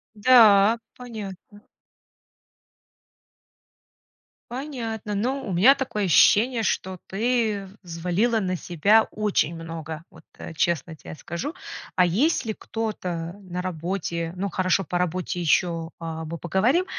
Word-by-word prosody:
Да, 215 -2 +6 0.2
понятно. 210 -4 -9 2.9
Понятно. 235 -6 -5
Ну 255 +5 -2
у 190 - -3
меня 235 +11 +6
такое 250 -7 -2
ощущение, 225 - +4
что 190 -3 -1
ты 215 -2 0
взвалила 180 +7 0
на 185 -3 -1
себя 200 +7 +3
очень 205 -6 0
много, 165 -1 -7
вот, 160 - -17
э, - - -8
честно 160 -1 -1
тебе 155 - -10
скажу. 170 - -5 0.4
А 180 - +5
есть 250 - +1
ли 220 - -2
кто-то 180 -8 -4
на 180 -2 -5
работе, 170 -1 -3
ну, 195 +2 -2
хорошо, 185 +1 +1
по 175 +2 -2
работе 180 0 -2
ещё, 165 0 +1
а, 160 -1 -5
мы 165 +2 -5
поговорим. 215 - +1
190 Hz, 120 wpm, -24 LUFS, 170-225 Hz, 2.9 s, Да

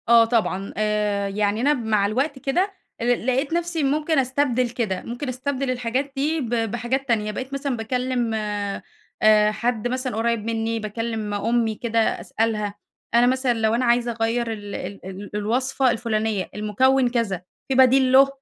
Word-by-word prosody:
آه 230 -1 +7
طبعًا، 215 -4 -1
آآ، 210 -1 0
يعني 205 +2 0
أنا 290 +3 +4
مع 220 -6 +1
الوقت 265 +7 -1
كده 360 +10 0 0.3
آآ، - - -1
لقيت 265 +5 -1
نفْسي 340 -2 -1
ممكن 300 +2 +1
أستبدِل 255 -2 +1
كده، 225 -6 -2
ممكن 245 +4 -4
أستبدِل 260 +1 -2
الحاجات 255 +3 -2
دي 300 +4 0
ب 240 - -4
بحاجات 240 +3 -1
تانية، 215 -3 +1
بقيت 260 +5 -6
مثلًا 275 -2 -2
باكلّم 245 0 -1
آآ 210 0 0
حد 230 +1 -1
مثلًا 255 -1 -2
قريّب 230 0 +1
منّي، 225 0 -1
باكلّم 220 0 -3
أمي 225 +2 +1
كده 230 0 -1
أسألها، 220 -2 0 0.4
أنا 240 +1 +5
مثلًا 260 -1 +2
لو 220 -1 +1
أنا 250 +2 +1
عايزة 240 0 +2
أغيّر 230 +1 -1
ال 205 -2 -7
ال 200 -2 -7
ال 190 +2 -7
الوصفة 255 +5 +1
الفلانية، 220 -4 -1
المُكوِّن 250 +5 +2
كذا 230 -7 -1 0.3
في 265 - 0
بديل 260 0 +5
له، 270 +1 +7
235 Hz, 160 wpm, -23 LUFS, 215-260 Hz, 0.4 s, آه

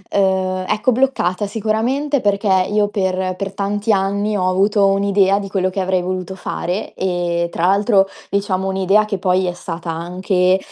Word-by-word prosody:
uhm, 190 -1 +1
ecco, 225 +5 +1
bloccata 215 -7 0
sicuramente, 230 +7 -1
perché 205 +1 0 0.2
io 210 0 +2
per 185 -2 -1
per 195 +1 -5
tanti 205 +2 -1
anni 200 +1 0
ho 185 - 0
avuto 200 +2 +2
un'idea 195 0 +3
di 195 - -6
quello 185 -1 0
che 190 +1 -3
avrei 185 -1 0
voluto 185 +1 -4
fare 185 +1 -4
e, 175 -2 -1
tra 170 - -1
l'altro 200 0 +3 0.2
diciamo 195 -1 -1
un'idea 195 +2 +3
che 210 -2 -3
poi 185 0 +1
è 180 - 0
stata 170 -1 -7
anche, 180 +2 +1
195 Hz, 160 wpm, -18 LUFS, 185-205 Hz, 0.2 s, un'idea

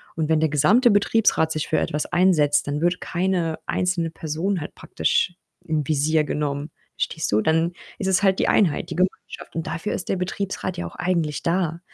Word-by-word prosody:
und 160 -1 -1
wenn 160 -1 +3
der 160 -1 +2
gesamte 205 - +4
Betriebsrat 205 -5 +3
sich 155 -1 -2
für - - +1
etwas 150 +1 -1
einsetzt, 155 -6 +3
dann 145 +2 -2
wird 175 +1 +1
keine 175 -3 -1
einzelne 180 -2 0
Person 165 +5 -2
halt 150 - -7
praktisch 180 - 0 0.3
in 155 -2 -1
Visier 155 +1 +2
genommen, 145 0 -3 0.2
verstehst 160 -7 -2
du? 105 - +3
Dann 165 +4 +1 0.2
ist 190 - -3
es 190 +1 +3
halt 190 -1 +3
die - - +2
Einheit, 180 -9 +2
die - - -5
Gemeinschaft 185 -2 -3
und 165 - -3
dafür 165 +6 -3
ist 185 - -5
der 190 - +1
Betriebsrat 185 0 -3
ja 175 - -3
auch - - -12
eigentlich 170 -5 -1
da. 170 -1 0
165 Hz, 190 wpm, -23 LUFS, 155-185 Hz, 0.3 s, gesamte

